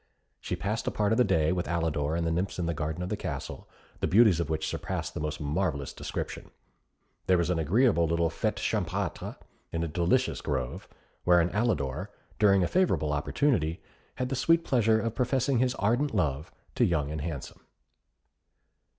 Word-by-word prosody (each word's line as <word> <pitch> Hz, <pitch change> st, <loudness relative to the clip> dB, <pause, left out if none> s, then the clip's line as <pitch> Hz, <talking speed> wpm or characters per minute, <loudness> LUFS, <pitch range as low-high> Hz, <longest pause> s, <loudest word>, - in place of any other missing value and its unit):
She -, -, -3 dB
passed 105 Hz, +3 st, -3 dB
a -, -, +4 dB
part 105 Hz, 0 st, 0 dB
of 110 Hz, -, +2 dB
the -, -, +7 dB
day 80 Hz, -8 st, +2 dB
with 90 Hz, -1 st, -1 dB
Alidor 80 Hz, -3 st, 0 dB
and 85 Hz, -, -1 dB
the 80 Hz, -, 0 dB
nymphs 90 Hz, +4 st, -1 dB
in 90 Hz, -, -1 dB
the 85 Hz, -, 0 dB
garden 80 Hz, +3 st, -3 dB
of 90 Hz, -, -4 dB
the -, -, -1 dB
castle, -, -, -6 dB, 0.3 s
the -, -, 0 dB
beauties 105 Hz, -4 st, +5 dB
of 85 Hz, -, -2 dB
which 80 Hz, 0 st, -1 dB
surpassed -, -, -3 dB
the -, -, -4 dB
most 75 Hz, 0 st, -3 dB
marvellous 75 Hz, -2 st, -1 dB
description. -, -, -5 dB, 0.8 s
There 95 Hz, -, +5 dB
was 85 Hz, +1 st, +1 dB
an 85 Hz, -, 0 dB
agreeable 85 Hz, -, +3 dB
little 85 Hz, 0 st, +1 dB
fête -, -, -1 dB
champêtre -, -, -2 dB, 0.4 s
in 85 Hz, 0 st, -1 dB
a -, -, -1 dB
delicious 85 Hz, +11 st, +1 dB
grove, 65 Hz, -4 st, -3 dB, 0.4 s
wherein 85 Hz, -1 st, +4 dB
Alidor, 95 Hz, -, -1 dB, 0.3 s
during 100 Hz, -3 st, +5 dB
a -, -, +1 dB
favourable 85 Hz, -, +1 dB
opportunity, 80 Hz, -, +1 dB, 0.4 s
had 125 Hz, 0 st, -2 dB
the 135 Hz, -, -1 dB
sweet 165 Hz, +5 st, +3 dB
pleasure 110 Hz, -3 st, +3 dB
of 115 Hz, -1 st, -2 dB
professing 130 Hz, +1 st, +1 dB
his 130 Hz, +1 st, +1 dB
ardent 120 Hz, +7 st, +1 dB
love 75 Hz, -5 st, -1 dB, 0.2 s
to -, -, +2 dB
Young 75 Hz, -4 st, +1 dB
and 80 Hz, -1 st, -4 dB
Handsome. 75 Hz, -4 st, -6 dB
85 Hz, 180 wpm, -28 LUFS, 80-110 Hz, 0.8 s, the